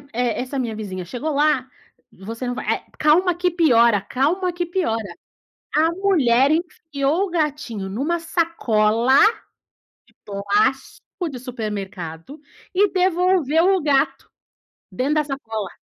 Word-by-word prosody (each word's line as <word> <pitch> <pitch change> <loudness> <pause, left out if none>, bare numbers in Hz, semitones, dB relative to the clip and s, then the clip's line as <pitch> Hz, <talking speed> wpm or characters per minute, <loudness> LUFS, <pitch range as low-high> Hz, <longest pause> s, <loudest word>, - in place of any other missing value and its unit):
e - - -2
e 245 -2 0
essa 260 +2 -4
minha 230 -3 -3
vizinha 190 -4 -6
chegou 260 - -4
lá, 285 -3 +2 0.4
você 225 +6 -7
não 245 - -1
vai - - -6
eh, - - -10
"calma 340 +4 +3
que 360 +1 0
piora, 235 - +4
calma 340 - 0
que 350 0 -2
piora". 330 - -1 0.7
A 320 +2 +3
mulher 300 -9 +3
enfiou 320 0 -1
o - - -10
gatinho 295 - -2
numa 285 - -1
sacola 255 -8 +2 0.9
de - - -27
plástico 340 - -1
de 255 - -7
supermercado, 210 - -6 0.3
e 405 +2 +3
devolveu 365 -2 +2
o 370 - -1
gato, 275 -1 0 0.6
dentro 275 +4 -1
da 305 - +2
sacola. 225 -9 -6
280 Hz, 130 wpm, -21 LUFS, 230-340 Hz, 0.9 s, piora